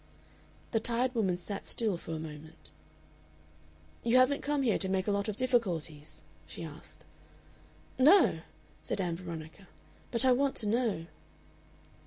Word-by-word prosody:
The 225 - +2
tired 240 +3 0
woman 195 -7 +1
sat 195 +3 -6
still 220 -5 0
for 165 -1 -6
a - - -2
moment. 150 - -10 1.3
"You 235 +2 +4
haven't 255 +3 +4
come 290 -1 0
here 230 -5 +2
to 190 - 0
make 190 0 0
a 210 - +1
lot 200 +1 0
of 215 - -2
difficulties?" 165 - -1 0.2
she 80 - -7
asked. 155 -1 -11 0.9
"No," 295 - +6 0.4
said - - -3
Ann 175 -3 -1
Veronica, 165 +1 -8 0.4
"but 240 +2 +2
I 260 - +6
want 270 +2 +2
to 215 - 0
know." 220 -6 0
200 Hz, 145 wpm, -31 LUFS, 165-245 Hz, 1.3 s, No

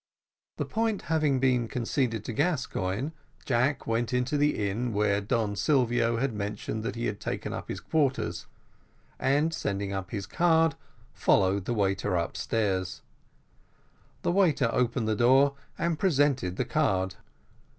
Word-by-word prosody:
The - - -1
point 220 -2 -1
having 150 -4 +2
been 125 -3 +2
conceded 120 -2 -1
to 120 - -4
Gascoigne, 130 - -1 0.3
Jack 130 +3 +1
went 115 +1 0
to 125 +3 0
the 145 -8 +2
inn 115 +4 -2
where 100 0 +2
Don 105 -1 -1
Silvio 120 -4 +2
had 130 0 0
mentioned 105 +1 -4
that 115 +3 -3
he 120 - -3
had 100 - -2
taken - - -4
up - - -6
his - - -4
quarters, 145 -5 -1 0.7
and 150 +4 +2
sending 100 -6 -2
up 95 -1 -4
his 100 -4 -4
card, 165 - +3 0.4
followed 95 0 +2
the 120 - -1
waiter 95 -3 0
upstairs. 95 +2 -1 1.2
The - - +2
waiter 175 -11 +3
opened 120 -2 +1
the 110 - +1
door, 135 +5 +5 0.2
and 170 -2 -1
presented 140 - +2
the 125 - -1
card. 95 - 0
120 Hz, 140 wpm, -28 LUFS, 105-145 Hz, 1.2 s, door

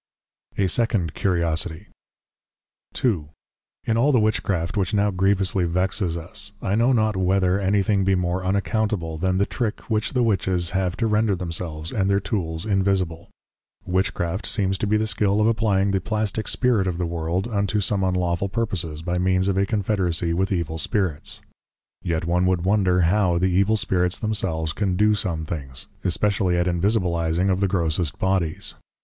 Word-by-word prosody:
A 100 - +2
SECOND 100 - +1
CURIOSITIE. 85 0 -1 1.2
II. 95 -12 +1 0.6
In 115 - +1
all 135 +6 +3
the 125 - +4
Witchcraft 100 -5 0
which 100 -1 0
now 105 0 +2
Grievously 95 -1 +1
Vexes 90 0 0
us, 85 +4 -3
I 105 -4 -2
know 115 +4 +3
not 110 -4 +2
whether 95 0 +2
anything 100 +1 +2
be 95 0 +2
more 90 0 -1
Unaccountable, 100 -4 -1
than 95 +1 +1
the 100 - +2
Trick 110 -2 -3
which 110 +3 0
the 125 -2 +2
Witches 95 -5 0
have 95 -2 -1
to 115 - 0
render 105 -1 +2
themselves, 85 -2 -4
and 95 -2 0
their 100 0 +3
Tools 90 -4 -3
Invisible. 95 -5 0 0.6
Witchcraft 90 0 -1
seems 95 -3 +1
to 105 - -1
be 105 +1 +3
the 110 - 0
Skill 100 -1 +1
of 105 - +3
Applying 105 -3 +2
the 95 -1 0
Plastic 110 +1 -2
Spirit 120 -7 +2
of 90 -2 -2
the 90 - -1
World, 85 +4 -2
unto 100 -2 0
some 100 0 0
unlawful 90 0 0
purposes, 90 -8 -3
by 90 +1 -1
means 95 +1 +2
of 100 - +1
a 100 - +1
Confederacy 95 -6 0
with 95 +4 0
Evil 85 -3 -2
Spirits. 90 -6 -1 0.6
Yet 85 -1 -2
one 90 +2 +2
would 90 -2 0
wonder 95 -2 +3
how 90 0 +2
the 95 +1 +1
Evil 100 +4 +3
Spirits 90 -3 +1
themselves 95 -8 -1
can 100 -3 -1
do 105 +3 +3
some 85 -6 -2
things; 70 -5 -5 0.2
especially 95 0 +1
at 85 - +1
Invisibilizing 90 -1 +1
of 95 - 0
the 100 - +2
Grossest 85 -3 0
Bodies. 95 -4 -1
95 Hz, 165 wpm, -23 LUFS, 85-105 Hz, 1.2 s, the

